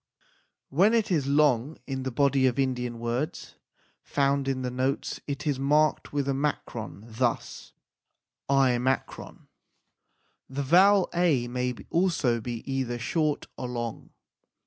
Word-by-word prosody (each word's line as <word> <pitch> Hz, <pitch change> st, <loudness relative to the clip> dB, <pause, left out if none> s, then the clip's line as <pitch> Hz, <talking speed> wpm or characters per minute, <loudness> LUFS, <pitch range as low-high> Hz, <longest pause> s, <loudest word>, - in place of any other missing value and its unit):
When 195 Hz, +11 st, +4 dB
it 220 Hz, -3 st, +1 dB
is 150 Hz, -6 st, +1 dB
long 140 Hz, -1 st, +2 dB
in 135 Hz, -1 st, -4 dB
the 130 Hz, -, -2 dB
body 135 Hz, +1 st, +3 dB
of 125 Hz, -, 0 dB
Indian 125 Hz, -3 st, -1 dB
words 120 Hz, +6 st, -3 dB, 0.5 s
found 140 Hz, -1 st, 0 dB
in 130 Hz, -1 st, -1 dB
the 125 Hz, -, -2 dB
notes 130 Hz, +3 st, -2 dB
it 140 Hz, +1 st, -4 dB
is 145 Hz, -3 st, 0 dB
marked 150 Hz, +3 st, +2 dB
with 145 Hz, -1 st, -1 dB
a 140 Hz, -, +1 dB
makron, 130 Hz, -7 st, -3 dB
thus 115 Hz, +1 st, -3 dB, 0.8 s
l. 135 Hz, -1 st, +4 dB, 1.8 s
The 140 Hz, +2 st, -3 dB
vowel 190 Hz, +7 st, +5 dB
a 165 Hz, -9 st, +2 dB
may 125 Hz, 0 st, -2 dB, 0.2 s
also 165 Hz, -10 st, +1 dB
be 120 Hz, 0 st, -5 dB
either 125 Hz, -3 st, -1 dB
short 150 Hz, +5 st, -1 dB
or 125 Hz, -, -5 dB
long. 120 Hz, -2 st, -5 dB
135 Hz, 130 wpm, -27 LUFS, 125-150 Hz, 1.8 s, vowel